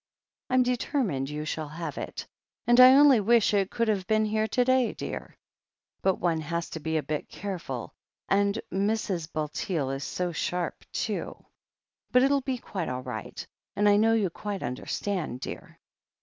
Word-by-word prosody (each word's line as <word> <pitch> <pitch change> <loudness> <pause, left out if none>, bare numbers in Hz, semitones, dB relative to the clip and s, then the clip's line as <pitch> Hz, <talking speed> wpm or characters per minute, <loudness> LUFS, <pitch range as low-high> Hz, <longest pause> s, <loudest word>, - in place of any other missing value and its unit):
I'm 255 0 +4
determined 240 - -1
you 150 +1 -4
shall 155 0 -3
have 155 0 -6
it, - - -6 0.4
and 240 +1 +5
I 255 +1 +10
only 280 -4 +7
wish 225 +1 +3
it 200 -2 +2
could 230 -1 -1
have 200 -4 0
been 215 0 +3
here 215 +1 0
to 245 +3 +1
day, 255 -2 +3
dear - - -7 0.3
— - - -55
^but 190 -1 +2
one 165 -2 0
has 170 +2 -3
to 160 - -5
be 160 +1 -1
a 155 - -1
bit 150 -1 -4
careful, 170 - -5 0.3
and 200 +2 +2
Mrs. 195 -4 -1
Bulteel 150 -1 -2
is 135 +1 -4
so 180 -1 -2
sharp, 175 +1 -3
too. - - -3 0.7
But 250 0 +5
it'll 275 +1 +3
be 260 -1 -2
quite 190 -7 -4
all 130 0 -4
right 115 -5 -6 0.2
— - - -66
and 205 0 +3
I 205 - +6
know 225 +2 +4
you 205 -6 +1
quite 205 +2 -5
understand, 140 +4 -3
dear." - - -8
195 Hz, 180 wpm, -27 LUFS, 160-225 Hz, 0.7 s, I